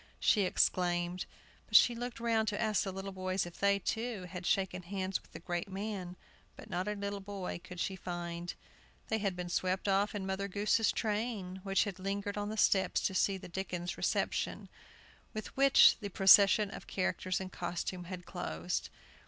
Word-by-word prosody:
she 210 - +4
exclaimed. 180 -1 +1 0.4
But - - -4
she 240 - +8
looked 240 +1 -5
round 225 -2 +1
to 205 -1 -1
ask 215 -3 +2
the 195 - -3
little 195 +1 -5
boys 185 0 -1
if 175 -1 -10
they, 200 0 +4
too, 220 +1 -3
had 180 0 -6
shaken 190 -2 +1
hands 190 +1 -3
with - - -24
the - - -8
great 175 +2 -3
man, 190 -2 -4 0.4
but - - -12
not 180 +3 -1
a 210 - -1
little 200 0 -3
boy 195 -3 -5
could 180 -1 -9
she 190 +2 -1
find. 175 -1 -5 0.5
They 220 - +1
had 200 -3 -1
been 180 0 -4
swept 185 +2 -1
off 200 +2 +2
in 195 -2 -3
Mother 190 +1 -2
Goose's 210 +3 +2
train, 210 -4 -2
which 195 0 +2
had 200 -4 -5
lingered 200 +1 -2
on 205 0 -2
the 220 - -4
steps 195 -2 +3
to - - 0
see 195 +1 +2
the - - -10
Dickens 180 -1 -4
reception, - - -1 0.7
with 215 - -6
which 275 0 +7
the 205 -3 -5
procession 200 +2 +6
of - - -9
characters 185 -1 -1
in 190 -1 -6
costume 175 +1 -4
had 180 0 -7
closed. 85 - -3
195 Hz, 185 wpm, -33 LUFS, 180-205 Hz, 0.7 s, she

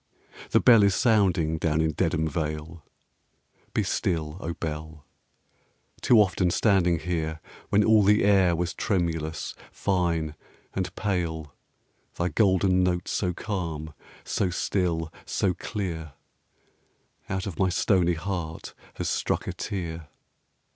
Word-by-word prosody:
The - - +4
bell 115 -3 +7
is 100 -2 +4
sounding 90 - +2
down 80 -1 +1
in 80 0 +2
Dedham 80 +2 0
Vale: 75 +1 -4 0.9
Be - - 0
still, 80 -2 -1
O 85 -2 -4
bell! 80 -1 -6 1.0
too 120 - +5
often 90 -3 +3
standing 90 -3 +3
here 80 -1 -3 0.3
When 105 +1 +4
all 110 0 +5
the 105 +2 +4
air 95 -4 +4
was 85 0 -2
tremulous, 80 -6 -2 0.2
fine, 85 -5 0 0.4
and 95 -1 -2
pale, 80 -7 -2 0.6
Thy 85 +1 0
golden 95 0 +3
note 90 -1 0
so 90 -3 0
calm, 85 -6 -4 0.3
so 95 - 0
still, 85 -3 -1
so 95 -2 0
clear, 85 -8 -5 1.2
Out 95 0 -2
of 95 -7 -6
my 95 - +3
stony 90 -1 +2
heart 85 -2 -5 0.2
has - - -3
struck - - -1
a - - -3
tear. 85 -5 -5
85 Hz, 125 wpm, -26 LUFS, 80-95 Hz, 1.2 s, bell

